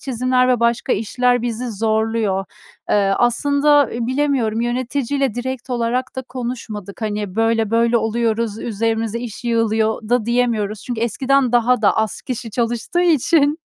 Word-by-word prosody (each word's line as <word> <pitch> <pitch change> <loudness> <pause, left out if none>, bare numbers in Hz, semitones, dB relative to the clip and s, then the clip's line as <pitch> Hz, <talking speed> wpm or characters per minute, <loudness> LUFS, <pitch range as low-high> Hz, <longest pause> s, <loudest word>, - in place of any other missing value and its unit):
çizimler 255 0 +1
ve 245 -2 +2
başka 235 +2 +1
işler 245 +3 +1
bizi 240 +1 -3
zorluyor. 220 -2 0 0.5
Iıı, 195 -1 +3
aslında, 285 +3 +3
iii, 235 0 -3
bilemiyorum 255 -5 0
yöneticiyle 255 +1 -1
direkt 260 +1 -5
olarak 245 +2 -1
da 260 - -3
konuşmadık, 235 -5 -6
hani, 210 -3 -3
böyle 225 -1 +1
böyle 230 +1 +3
oluyoruz, 225 -1 -1
üzerimizde 225 0 -2
iş 240 -1 -7
yığılıyor 220 -1 0
da 245 -2 +2
diyemiyoruz. 230 -4 0
Çünkü 240 -3 -4
eskiden 260 +2 +1
daha 245 0 +3
da 205 - +3
az 220 -1 -1
kişi 245 -3 -5
çalıştığı 240 +9 -1
için. 310 -2 +3
235 Hz, 140 wpm, -19 LUFS, 220-255 Hz, 0.5 s, Iıı